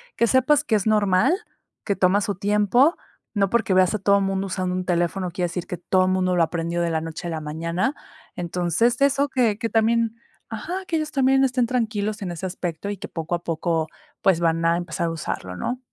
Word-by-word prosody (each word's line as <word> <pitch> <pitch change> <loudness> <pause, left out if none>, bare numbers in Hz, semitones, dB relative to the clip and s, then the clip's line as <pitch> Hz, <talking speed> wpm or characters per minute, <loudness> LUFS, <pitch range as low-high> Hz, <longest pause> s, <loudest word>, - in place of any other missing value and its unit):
que 235 - +3
sepas 260 +5 +3
que 255 - -2
es 210 0 0
normal, 210 - +3 0.5
que 200 - -1
toma 190 +2 +3
su 200 - -1
tiempo, 210 - +3 0.4
no 195 -2 +2
porque 220 -5 +2
veas 185 +2 +4
a 215 - -2
todo 200 +1 +3
mundo 195 0 -1
usando 185 0 -2
un 185 - -2
teléfono, 175 +1 0
quiere 180 +1 -1
decir 170 0 -5
que 180 - -4
todo 185 +1 +1
mundo 185 -1 +1
lo 170 - +3
aprendió 170 +1 -2
de 170 - 0
la 160 - 0
noche 165 +2 -6
a 170 - -3
la 160 -1 -3
mañana. 165 - -2 0.4
Entonces, 180 - 0
eso 280 +1 +3
que 235 -6 +1
que 230 -2 -2
también 230 0 +1 0.3
ajá, 355 - -5
que 330 - -1
ellos 310 0 -3
también 270 -1 +3
estén 250 -2 +2
tranquilos 215 -3 -1
en 180 - -3
ese 175 +2 -4
aspecto, 180 +1 -4
y 205 - -4
que 210 - -7
poco 165 +1 -3
a 170 - -7
poco, 165 -1 -1 0.4
pues, 190 -4 +4
van 165 -1 +1
a 165 0 +4
empezar 170 -1 -3
a 165 - -1
usarlo, 95 - -5
¿no? 250 - -3
190 Hz, 215 wpm, -23 LUFS, 175-230 Hz, 0.5 s, veas